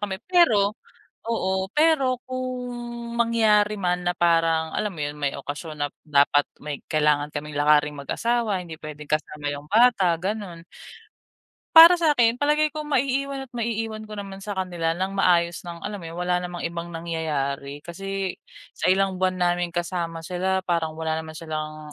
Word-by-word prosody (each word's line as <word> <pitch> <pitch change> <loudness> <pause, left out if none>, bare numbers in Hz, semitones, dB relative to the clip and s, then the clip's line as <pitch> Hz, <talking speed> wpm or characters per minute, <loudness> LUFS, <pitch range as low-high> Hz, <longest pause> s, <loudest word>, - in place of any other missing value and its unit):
kami. 200 -2 -3
Pero 225 - +4 0.6
oo. 190 -3 -1
Pero 300 -5 +3
kung, 245 -2 -5
mangyari 220 -3 +3
man 180 -1 0
na 175 - +1
parang 165 -2 +2
alam 210 -1 -1
mo 170 - -10
'yon, 145 0 -3
may 145 -2 -1
okasyon 150 +2 -7
na 145 - +1 0.2
dapat 145 -1 +4 0.2
may 145 -2 -6
kailangan 150 -1 +2
kaming 150 0 -6
lakaring 150 0 +3
mag-asawa, 220 - -1
hindi 170 -3 -8
pwedeng 150 -1 -8
kasama 150 -1 -2
'yung 145 +1 -5
bata, 220 -5 +5
gano'n. 195 -2 -4 1.2
Para 335 +2 +12
sa’kin 245 -7 +3
palagay 300 +1 +2
ko, 310 - -4
maiiwan 275 -1 -1
at 260 - -21
maiiwan 225 -2 -3
ko 215 - -7
naman 195 -1 -7
sa 200 0 -5
kanila 175 -3 -1
nang 190 +2 -2
maayos 175 -3 +2
nang 170 -1 -8
alam 205 -1 -4
mo - - -10
'yun, 165 - -9
wala 180 0 +1
namang 175 -1 -6
ibang 170 0 -4
nangyayari. 150 -4 -3
Kasi 195 +2 -4 0.4
sa - - -2
ilang 190 0 +2
buwan 185 0 +1
namin 175 -1 +1
kasama 170 -1 -3
sila 185 +2 -1
parang 165 -3 -1
wala 160 0 -2
naman 160 0 -9
silang 155 -1 -6
180 Hz, 160 wpm, -24 LUFS, 160-220 Hz, 1.2 s, Para